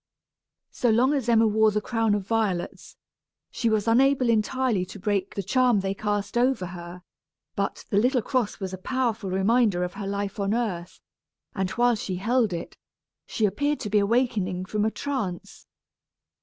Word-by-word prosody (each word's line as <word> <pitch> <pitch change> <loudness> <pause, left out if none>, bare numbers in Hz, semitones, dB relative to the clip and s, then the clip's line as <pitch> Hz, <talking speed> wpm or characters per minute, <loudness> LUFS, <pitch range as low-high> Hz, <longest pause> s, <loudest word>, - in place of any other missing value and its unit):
So 245 - 0
long 245 +6 +3
as 265 -5 -1
Emma 225 -1 +5
wore 220 0 +4
the 210 0 0
crown 225 -1 0
of 200 -2 -3
violets, 205 -5 -2 0.6
she 235 - 0
was 215 0 0
unable 255 +2 +3
entirely 230 -2 +1
to 190 +3 -9
break 200 -1 -1
the 200 - -2
charm 245 +1 +3
they 195 0 -1
cast 205 +2 -2
over 250 -6 +1
her. 175 0 -9 0.5
But 200 0 -3
the 200 - +4
little 250 +1 +2
cross 250 -4 -1
was 190 -2 -5
a 185 - -6
powerful 230 -2 -1
reminder 195 0 +2
of 180 - -4
her 200 -1 -6
life 200 0 -3
on 200 +2 0
earth; 185 -7 -3 0.5
and 190 -2 -1
while 245 0 +4
she 205 -4 -3
held 225 +3 +1
it, 170 -1 -5 0.5
she 220 - 0
appeared 290 +8 0
to 210 - -4
be 210 - +4
awakening 200 -4 0
from 210 +2 -1
a - - +3
trance. 220 -9 -5
215 Hz, 170 wpm, -25 LUFS, 195-240 Hz, 0.6 s, Emma